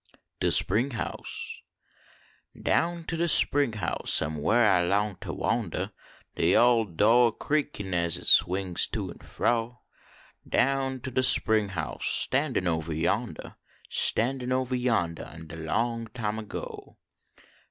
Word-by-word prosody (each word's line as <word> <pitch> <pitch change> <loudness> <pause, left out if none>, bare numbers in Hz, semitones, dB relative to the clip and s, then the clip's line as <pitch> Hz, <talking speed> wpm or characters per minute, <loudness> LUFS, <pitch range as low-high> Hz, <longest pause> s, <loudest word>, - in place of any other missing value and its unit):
DH - - +1
SPRING 115 +8 +3
HOUSE - - -3 1.0
Down 170 0 0
to 165 - -4
de 170 +1 -1
spring 145 -6 +5
house 105 -6 0
am 75 +1 -4
whar 115 +11 +2
I 95 -4 +3
long 100 +2 -1
to - - -7
wandah 95 -2 -3 0.4
De 85 +2 +2
ole 120 -2 +4
do 105 +7 +3
a - - -1
creakin 145 -12 -3
as 85 -2 0
hit - - -9
swings 90 -1 +2
to - - -5
en - - -14
fro, 120 +1 -2 0.7
Down 135 -1 0
to 130 - -6
de 130 - 0
spring 110 -5 +3
house 90 -5 -2
standin 130 -9 +3
ovah 80 -1 -2
yonclah. 105 +8 -3 0.3
Standin 125 +2 0
ovah 130 0 -1
vondnh 90 -9 0 0.2
in 80 0 -11
de 80 +1 -10
long 115 +8 -2
time 110 -2 -4
ago. 105 - -9
110 Hz, 140 wpm, -26 LUFS, 90-125 Hz, 1.0 s, spring